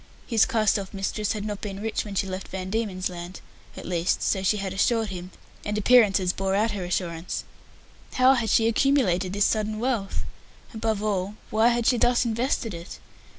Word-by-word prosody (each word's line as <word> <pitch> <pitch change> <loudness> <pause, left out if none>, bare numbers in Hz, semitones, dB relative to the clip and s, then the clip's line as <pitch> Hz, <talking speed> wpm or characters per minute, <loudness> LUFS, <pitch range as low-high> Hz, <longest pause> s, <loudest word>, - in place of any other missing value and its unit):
His 225 -3 +3
cast 215 -5 +2
off 195 0 -8
mistress 200 +2 -1
had 210 -1 -4
not 205 -1 -4
been 195 -2 -5
rich 220 +1 -2
when 205 -2 -7
she 195 - +1
left 190 0 -5
Van 185 0 -5
Diemen's 200 -4 -1
Land 175 0 -8 0.4
at - - -8
least, 175 0 0
so 190 - +1
she 195 +3 +2
had 195 -2 -3
assured 225 +2 +1
him, 180 -1 -6 0.3
and 210 0 -2
appearances 205 -5 +4
bore 195 0 -1
out 215 +2 +2
her 200 -3 -4
assurance. 175 -1 -3 0.7
How 255 +1 +5
had 235 -4 0
she 225 +2 +4
accumulated 230 -8 +2
this 205 0 +2
sudden 215 -1 0
wealth? 230 -4 -1 0.5
Above 220 -2 -1
all, 200 -1 -1 0.2
why 220 +2 +4
had 240 -1 +1
she 245 - +4
thus 245 +1 +3
invested 230 -1 -1
it? 170 +1 -8
205 Hz, 190 wpm, -25 LUFS, 190-225 Hz, 0.7 s, How